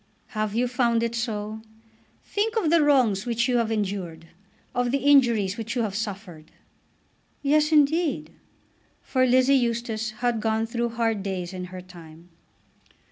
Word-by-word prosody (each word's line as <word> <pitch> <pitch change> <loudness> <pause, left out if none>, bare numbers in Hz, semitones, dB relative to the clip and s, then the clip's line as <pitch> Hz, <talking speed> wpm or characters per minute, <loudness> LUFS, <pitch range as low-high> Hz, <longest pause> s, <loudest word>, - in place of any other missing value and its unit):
"Have 215 -2 -3
you 245 +2 +1
found 235 -2 +1
it 235 0 -1
so? 220 -2 -3 0.6
Think 440 +2 -2
of 340 -8 +1
the 335 -1 +5
wrongs 245 -8 +3
which 240 +1 +1
you 250 -1 +2
have 230 -1 0
endured; 190 -6 -3 0.5
of 245 0 0
the 275 - +1
injuries 240 -8 +3
which 225 +1 -4
you 240 - +1
have 210 -3 -3
suffered." 195 -7 -6 0.9
"Yes, 300 +2 +3
indeed." 310 +1 +2 0.7
For 255 -1 +1
Lizzie 255 +2 +4
Eustace 235 -3 0
had 240 -1 0
gone 220 0 0
through 235 +1 -2
hard 225 -2 -1
days 190 -2 -4
in 180 -1 -5
her 180 0 -9
time. 170 -2 -14
230 Hz, 150 wpm, -25 LUFS, 205-255 Hz, 0.9 s, the